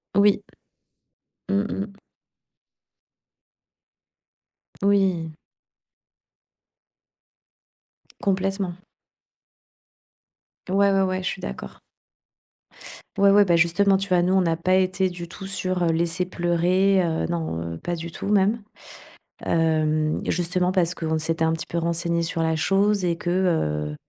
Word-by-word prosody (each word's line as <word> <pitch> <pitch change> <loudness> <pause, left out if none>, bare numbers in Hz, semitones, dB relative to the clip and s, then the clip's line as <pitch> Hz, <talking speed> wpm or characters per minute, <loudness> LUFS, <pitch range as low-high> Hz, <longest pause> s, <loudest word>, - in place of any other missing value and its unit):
Oui. 200 0 +4 1.1
Mmh 200 +1 +1
mh. 195 - -3 3.0
Oui. 190 -6 +1 2.9
Complètement. 195 -1 -1 2.0
Ouais, 200 +1 +3
ouais, 195 0 +3
ouais, 185 0 -1
je - - -2
suis - - -6
d'accord. 65 0 -7 1.4
Ouais, 200 0 +5
ouais, 205 0 +6
bah, 175 -3 +3
justement 175 +4 +3
tu 195 +1 -4
vois? 180 -1 +3
Nous 180 +2 +1
on 190 - +4
n'a 165 -2 0
pas 185 +3 +1
été 185 0 +1
du 175 -1 -8
tout 190 +3 -9
sur, 185 -1 -2
heu, - - +2
laisser 170 +2 0
pleurer, 180 +2 +2
heu, 165 -2 -1
non, 165 - -3
heu, - - -7
pas 175 - -3
du 170 0 -7
tout - - -6
même. 205 +2 +2 0.8
Hem, 155 -1 +1
justement 180 +1 +1
parce 180 -2 +1
qu'on 160 -1 -2
s'était 160 +1 0
un 160 - +1
petit 165 - -5
peu 170 - -3
renseignés 170 0 0
sur 165 0 -2
la 160 0 +1
chose 195 +4 +1
et 170 -1 0
que, 175 - -4
heu 115 - 0
180 Hz, 125 wpm, -23 LUFS, 165-195 Hz, 3.0 s, ouais